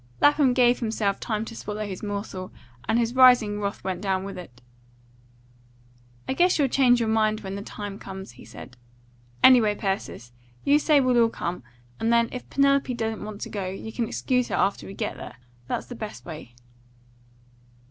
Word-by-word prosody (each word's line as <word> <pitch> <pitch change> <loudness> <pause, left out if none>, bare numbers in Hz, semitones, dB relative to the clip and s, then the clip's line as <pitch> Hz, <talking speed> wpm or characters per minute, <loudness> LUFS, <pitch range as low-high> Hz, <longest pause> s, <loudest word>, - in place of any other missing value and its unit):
Lapham 290 -3 +4
gave 245 -1 +4
himself 220 -4 -1
time 220 -1 -2
to 230 - -9
swallow 210 0 -5
his 190 -3 -6
morsel, 200 -3 -5 0.4
and 225 - +3
his 235 0 0
rising 245 -5 +5
wrath 200 0 -4
went 185 -2 -3
down 190 -2 -1
with 195 0 -6
it. 135 -9 -11 1.7
"I - - 0
guess 355 +5 +3
you'll 280 -3 +2
change 245 -2 +4
your 230 - 0
mind 215 -1 +1
when 190 -2 -6
the 200 - -5
time 205 -1 -7
comes," 190 0 -8
he - - -15
said. 125 - -12 0.7
"Anyway, 230 -5 +6
Persis, 195 - -4 0.3
you 290 +1 +4
say 300 -1 +4
we'll 250 -3 +3
all 230 - +4
come, 175 -5 -4 0.4
and 225 - +1
then, 235 0 +3
if 250 - -8
Penelope 275 -1 +2
don't 225 -2 -3
want 210 -1 -8
to - - -5
go, 195 -3 -4
you 195 +4 -7
can 235 -2 -1
excuse 250 +1 0
her - - -2
after 200 - 0
we 195 - -9
get - - -3
there. - - -9 0.3
That's - - -3
the - - -9
best 215 -3 -8
way." 155 -8 -9
220 Hz, 185 wpm, -25 LUFS, 195-245 Hz, 1.7 s, Anyway